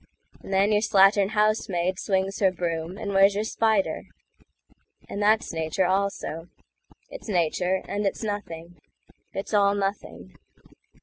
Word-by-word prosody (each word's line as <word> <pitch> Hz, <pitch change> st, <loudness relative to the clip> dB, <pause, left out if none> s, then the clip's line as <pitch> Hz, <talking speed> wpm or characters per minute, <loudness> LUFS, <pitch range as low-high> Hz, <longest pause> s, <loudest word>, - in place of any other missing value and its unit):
And -, -, -10 dB
then 195 Hz, +2 st, +3 dB
your 210 Hz, 0 st, +3 dB
slattern 195 Hz, -1 st, +4 dB
housemaid 190 Hz, -4 st, +1 dB
swings 195 Hz, 0 st, -1 dB
her 190 Hz, -2 st, +3 dB
broom, 170 Hz, 0 st, -4 dB
And 200 Hz, -1 st, -4 dB
where's 195 Hz, +1 st, +5 dB
your 210 Hz, -, 0 dB
spider? 220 Hz, -2 st, 0 dB, 1.0 s
And 200 Hz, -, -5 dB
that's 215 Hz, -2 st, +2 dB
Nature, 160 Hz, +3 st, -1 dB
also.It's 190 Hz, -, -5 dB
Nature, 180 Hz, +1 st, 0 dB
and 205 Hz, -, -2 dB
it's 195 Hz, -, -3 dB
Nothing. 175 Hz, -6 st, -6 dB, 0.5 s
It's 195 Hz, +3 st, -5 dB
all 200 Hz, -1 st, +3 dB
Nothing. 195 Hz, -, -5 dB
195 Hz, 125 wpm, -25 LUFS, 180-205 Hz, 1.0 s, where's